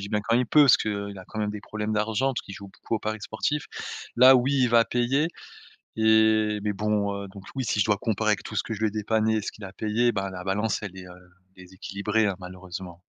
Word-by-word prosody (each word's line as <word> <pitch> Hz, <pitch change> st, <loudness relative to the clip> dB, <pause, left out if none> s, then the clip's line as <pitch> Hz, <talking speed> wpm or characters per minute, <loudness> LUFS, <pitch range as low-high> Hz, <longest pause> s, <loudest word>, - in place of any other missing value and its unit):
dis 100 Hz, -, -6 dB
bien 105 Hz, 0 st, 0 dB
quand 115 Hz, -, +2 dB
il 125 Hz, -, +1 dB
peut, 150 Hz, +5 st, +6 dB
parce 135 Hz, -, +6 dB
qu'il 100 Hz, -2 st, -3 dB
a 95 Hz, -, -10 dB
quand 110 Hz, -, -7 dB
même 105 Hz, -1 st, 0 dB
des 105 Hz, -1 st, -6 dB
problèmes 110 Hz, +1 st, -4 dB
d'argent, 110 Hz, +5 st, +1 dB
parce 120 Hz, -, -3 dB
qu'il 95 Hz, -, -10 dB
joue 100 Hz, -1 st, -10 dB
beaucoup 105 Hz, -, -5 dB
au 110 Hz, -, 0 dB
paris 110 Hz, +1 st, -4 dB
sportifs, 145 Hz, +8 st, -2 dB, 0.5 s
là, 130 Hz, +2 st, +8 dB
oui, 130 Hz, +2 st, +2 dB
il 125 Hz, -, +3 dB
va 115 Hz, 0 st, +5 dB
payer, 135 Hz, +6 st, +1 dB, 0.7 s
et 110 Hz, -1 st, +4 dB
mais 105 Hz, -, 0 dB
bon, 105 Hz, 0 st, 0 dB
heu -, -, -7 dB
donc 95 Hz, 0 st, -12 dB
oui, 130 Hz, -, -2 dB
si 105 Hz, -1 st, 0 dB
je -, -, +3 dB
dois 105 Hz, -2 st, +2 dB
comparer 110 Hz, 0 st, -1 dB
avec 105 Hz, -, +1 dB
tout 110 Hz, -, -8 dB
ce -, -, +1 dB
que 115 Hz, -, -5 dB
je 105 Hz, -, -6 dB
lui 110 Hz, -, +2 dB
ai -, -, -3 dB
dépanné 110 Hz, +1 st, +1 dB
et 110 Hz, -, 0 dB
ce -, -, -4 dB
qu'il 105 Hz, -, -10 dB
a 95 Hz, -, -10 dB
payé, 115 Hz, +3 st, +1 dB
bah, 95 Hz, -1 st, -2 dB
la 90 Hz, -1 st, -7 dB
balance, 100 Hz, +2 st, -1 dB
elle 95 Hz, -2 st, -7 dB
est, 90 Hz, -, -9 dB
heu, 90 Hz, 0 st, -15 dB, 0.3 s
déséquilibrée, 100 Hz, +4 st, -2 dB
hein, 100 Hz, -, -1 dB
malheureusement. 90 Hz, -1 st, -9 dB
105 Hz, 260 wpm, -26 LUFS, 100-110 Hz, 0.7 s, là